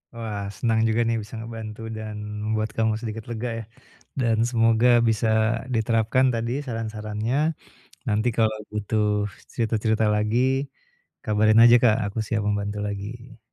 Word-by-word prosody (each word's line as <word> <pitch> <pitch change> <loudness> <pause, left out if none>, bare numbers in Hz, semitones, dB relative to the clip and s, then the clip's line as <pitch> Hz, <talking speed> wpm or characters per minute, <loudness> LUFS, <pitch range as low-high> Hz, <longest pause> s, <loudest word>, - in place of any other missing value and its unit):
Wah. 105 -3 -4
Senang 115 -2 +1
juga 110 +1 +1
nih 115 0 +1
bisa 105 - -10
ngebantu 110 -1 -7 0.2
dan 110 -1 -6 0.3
membuat 110 0 0
kamu 110 -1 +2
sedikit 110 -1 -5
lega 120 +1 -3
ya. - - -6 0.6
Dan 115 -3 +2
semoga 115 0 +3 0.2
bisa 110 0 +1 0.5
diterapkan 115 +3 +2
tadi 115 +1 -2
saran-sarannya. 110 0 -3 0.7
Nanti 110 +1 +1
kalau 110 -1 +2 0.2
butuh 105 +1 -1 0.5
cerita-cerita 110 -1 0
lagi, 105 +3 +1 0.8
kabarin 110 +1 +4
aja 120 0 +8
Kak. 110 -3 +5
Aku 100 +3 -4
siap 110 -1 -1
membantu 105 0 -1
lagi. 110 +4 -7
110 Hz, 135 wpm, -24 LUFS, 105-115 Hz, 0.8 s, aja